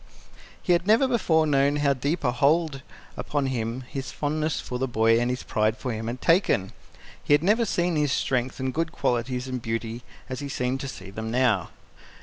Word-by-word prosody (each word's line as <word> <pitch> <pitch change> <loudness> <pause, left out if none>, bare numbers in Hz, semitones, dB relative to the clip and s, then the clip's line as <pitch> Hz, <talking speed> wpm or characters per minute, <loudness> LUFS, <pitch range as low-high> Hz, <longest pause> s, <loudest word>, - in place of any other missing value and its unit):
He 180 - +3
had 175 +2 +1
never 225 +5 +5
before 165 -10 +2
known 140 -1 +3
how 145 -1 +2
deep 145 +6 -2
a 125 - +2
hold 145 +3 +2 0.3
upon 145 -2 -2
him 120 -1 -2
his 130 +1 -6
fondness 155 +1 -1
for 125 - -5
the 130 - 0
boy 115 -1 +3
and 120 +1 0
his 125 0 -3
pride 110 0 +1
in 125 - 0
him 110 0 -4
had 125 +2 -4
taken. 165 - +2 0.5
He 145 - +5
had 145 - 0
never 220 +5 +3
seen 175 -4 0
his 150 -2 +1
strength 130 -1 -1
and 130 0 -2
good 165 0 -1
qualities 125 -2 -1
and 130 -1 -4
beauty 115 +1 -3 0.3
as 130 -2 -5
he 140 -1 -5
seemed 125 0 -1
to 135 - -5
see 95 -7 -9
them 110 +2 -5
now. 115 -7 +2
130 Hz, 200 wpm, -25 LUFS, 120-155 Hz, 0.5 s, never